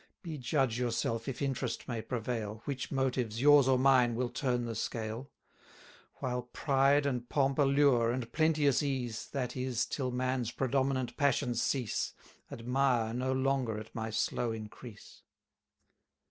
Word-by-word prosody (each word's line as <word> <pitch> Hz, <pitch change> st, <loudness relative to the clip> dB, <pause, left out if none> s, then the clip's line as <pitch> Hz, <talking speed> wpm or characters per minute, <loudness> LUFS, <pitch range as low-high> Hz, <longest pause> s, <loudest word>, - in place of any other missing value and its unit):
Be 160 Hz, -4 st, -5 dB
judge 130 Hz, -2 st, 0 dB
yourself, 115 Hz, -1 st, -1 dB
if 135 Hz, +1 st, -3 dB
interest 130 Hz, -3 st, -2 dB
may 120 Hz, -3 st, -3 dB
prevail, 110 Hz, -3 st, -4 dB
Which 135 Hz, -2 st, -4 dB
motives, 125 Hz, -4 st, -1 dB
yours 145 Hz, 0 st, +6 dB
or 130 Hz, -1 st, +4 dB
mine, 125 Hz, -3 st, +4 dB
will 125 Hz, +1 st, -1 dB
turn 125 Hz, -1 st, -1 dB
the 115 Hz, -, -3 dB
scale. 115 Hz, +4 st, -4 dB, 0.9 s
While 125 Hz, -1 st, -2 dB
pride 140 Hz, 0 st, +3 dB
and 125 Hz, -3 st, -2 dB
pomp 140 Hz, 0 st, +1 dB
allure, 140 Hz, -4 st, +4 dB
and 120 Hz, -1 st, -4 dB
plenteous 155 Hz, -4 st, +3 dB
ease, 130 Hz, -6 st, -2 dB
That 125 Hz, -3 st, -3 dB
is, 125 Hz, -2 st, -1 dB
till 130 Hz, -3 st, -2 dB
man's 125 Hz, -1 st, -1 dB
predominant 130 Hz, 0 st, -1 dB
passions 135 Hz, -4 st, +1 dB
cease, 125 Hz, -7 st, -1 dB, 0.4 s
Admire 125 Hz, -1 st, +1 dB
no 130 Hz, +2 st, -1 dB
longer 130 Hz, -4 st, 0 dB
at 110 Hz, +1 st, -9 dB
my 110 Hz, 0 st, -3 dB
slow 115 Hz, +2 st, -1 dB
increase. 110 Hz, 0 st, -10 dB
125 Hz, 140 wpm, -32 LUFS, 115-135 Hz, 0.9 s, yours